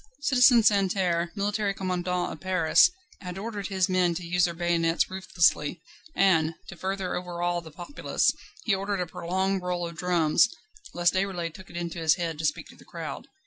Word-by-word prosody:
Citizen 250 -4 +5
Santerre, 190 -4 +2
military 205 0 -1
commandant 180 -1 -2
of - - -11
Paris, 185 -4 +4 0.3
had 180 -1 -7
ordered 205 -1 -4
his 190 -2 +1
men 180 -2 +2
to 175 +1 -5
use 175 +1 +2
their 170 - -2
bayonets 170 0 +1
ruthlessly, 175 -4 +1 0.4
and, 165 -4 +3
to 190 - -8
further 190 +1 -3
overawe 175 -1 -2
the 165 - -11
populace, 175 - -1 0.3
he 220 - +1
ordered 195 0 -1
a 180 - 0
prolonged 190 +3 -2
roll 180 -1 -2
of 170 - -9
drums, 175 +2 +3 0.5
lest 175 0 +3
Déroulède 185 -4 -2
took 185 +1 -13
it 175 - -8
into 170 -1 -4
his 160 -1 +3
head 165 -4 -4
to 160 - -2
speak 150 - -1
to - - -14
the - - -17
crowd. - - -7
180 Hz, 180 wpm, -27 LUFS, 170-195 Hz, 0.5 s, Citizen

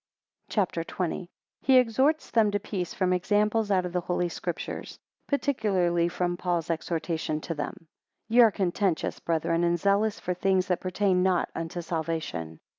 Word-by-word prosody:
CHAPTER 185 -5 0
XX. 175 +1 -3 0.3
He 265 -1 +5
exerts 260 +6 +2
them 225 -3 +4
to 205 0 0
peace 190 -3 -4
from 185 -1 +1
examples 210 +4 +1
out 185 -2 +2
of 175 - -5
the 180 - 0
Holy 175 0 -1
Scriptures, - - -5 0.3
20 280 - +3
particularly 185 - +1
from 175 0 -1
St. 175 - -5
Paul's 175 -2 -1
exhortation 160 -1 -2
to 165 - -4
them. 150 +2 -6 0.4
YE 235 +3 +6
are 230 - +8
contentious, 190 -2 -1
brethren, 165 +1 0
and 175 0 +2
zealous 200 +3 +2
for 180 - -2
things 190 0 +1
that 180 - +1
pertain 185 0 +1
not 185 -1 +1
unto 165 +1 -4
salvation. 160 - -3
180 Hz, 165 wpm, -27 LUFS, 170-205 Hz, 0.4 s, are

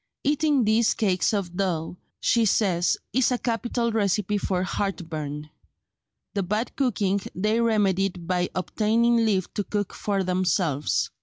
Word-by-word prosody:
"Eating 295 -2 +2
these 220 +1 +3
cakes 190 -4 +1
of 195 -5 -2
dough," 175 -4 -1 0.2
she 235 -1 +2
says, 190 -5 +2 0.2
"is 260 0 +3
a 250 - +1
capital 235 0 -1
recipe 210 -1 0
for 185 -2 -1
heartburn." 155 -7 -4 0.8
The 200 - 0
bad 210 +6 -2
cooking 200 -7 0
they 215 +5 +1
remedied 195 -5 +1
by 180 0 0
obtaining 225 +5 +2
leave 215 -5 +1
to 205 - -1
cook 205 0 -3
for 200 -2 -1
themselves. 180 -5 0
200 Hz, 135 wpm, -25 LUFS, 180-225 Hz, 0.8 s, these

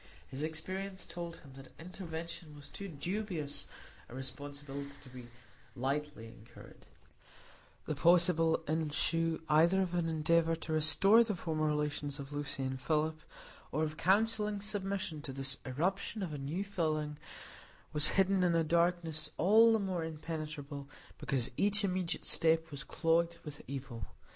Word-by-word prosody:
His 130 - -5
experience 185 +5 -4
told 170 -1 -6
him 135 -2 -14
that 135 0 -13
intervention 165 -2 -7
was 145 -1 -12
too 200 +7 -7
dubious 170 -2 -3 0.4
a 120 - -9
responsibility 140 +1 -6
to 130 - -12
be 125 -1 -10 0.5
lightly 135 -2 -2
incurred; 115 +1 -14 1.0
the - - -1
possible 165 +1 +4
issue 160 +1 0
either 165 +5 +5
of 185 -2 0
an 170 -2 +1
endeavor 165 +1 +3
to 160 0 -4
restore 195 +9 +6
the 215 -3 -2
former 155 -3 -1
relations 150 -1 -1
with 140 -1 -8
Lucy 145 -2 -2
and 130 0 -3
Philip, 155 +2 0 0.5
or 155 +3 +1
of 155 0 -2
counselling 210 +4 +2
submission 195 -6 -3
to 145 - -6
this 135 0 -1
irruption 190 - -1
of 165 -5 -4
a 145 - -4
new 155 +8 -2
feeling, 155 -6 -1 0.7
was 150 0 +5
hidden 195 0 +4
in 175 -2 +3
a 165 - +4
darkness 165 -2 +1
all 220 +6 +7
the 225 - +4
more 190 -5 -1
impenetrable 150 -3 -5 0.3
because 135 -3 0
each 205 +1 +3
immediate 185 -3 -1
step 165 -1 +2
was 140 -1 -6
clogged 170 0 +1
with 150 -1 -7
evil. 130 -6 -5
160 Hz, 145 wpm, -34 LUFS, 145-180 Hz, 1.0 s, all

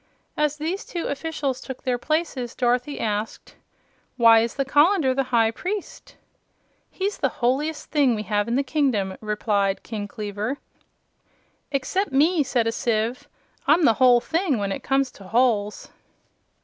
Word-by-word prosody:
As 300 0 0
these 330 +6 -3
two 345 - -5
officials 285 -3 -3
took 265 -2 -8
their 250 -1 0
places, 300 -5 -2
Dorothy 250 +3 0
asked: 210 0 -3 0.6
"Why 230 -2 +7
is 230 +1 -1
the 275 - -1
colander 295 0 +3
the 270 +1 0
High 225 -2 +3
Priest?" 385 - -6 0.7
"He's 395 +2 -3
the 270 - +2
holiest 280 +6 -1
thing 280 -6 +3
we 210 - -4
have 205 0 0
in 235 - 0
the 275 - +2
kingdom," 255 -10 0
replied 210 -2 0
King 210 -3 -5
Kleaver. 210 +5 -4 1.1
"Except 295 +8 -1
me," 310 +5 +3
said 250 -4 0
a 225 - +1
sieve. 235 +5 -1 0.4
"I'm 315 +4 +5
the 230 - +6
whole 250 -1 +7
thing 325 0 0
when 200 -1 -2
it - - -4
comes 270 -1 +1
to 195 - -14
holes." 215 -2 +1
255 Hz, 150 wpm, -24 LUFS, 225-295 Hz, 1.1 s, Why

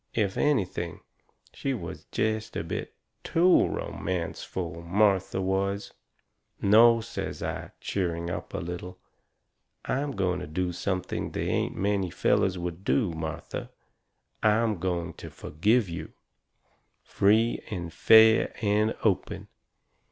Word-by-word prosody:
If 100 -4 +1
anything, 95 - 0 0.5
she 135 -1 -2
was 115 - -7
jest 110 0 -2
a - - -2
bit - - -5 0.3
TOO 175 +2 +4
romanceful, 85 -1 -4
Martha 95 +1 +2
was. 100 +1 -1 0.7
"No," 115 +3 +6
says 115 - -5
I, - - -4
cheering 85 -3 -2
up - - -5
a - - -1
little, 90 +1 -6 0.9
"I 130 - 0
am 145 0 -2
going 90 -4 0
to - - -6
do 90 +3 -1
something 90 +1 -2
they - - -3
ain't - - 0
many 100 -2 0
fellers 95 +2 +1
would 85 +1 -5
do, 110 -3 +2
Martha. 80 -1 -5 0.7
I'm 110 -2 +2
going 85 -2 -2
to - - -7
forgive 105 +8 +1
you. 85 -2 -7 0.9
Free 110 +4 +2
and 85 -6 -5
fair 110 +4 +6
and 105 0 +2
open. 100 0 0
95 Hz, 120 wpm, -27 LUFS, 90-110 Hz, 0.9 s, No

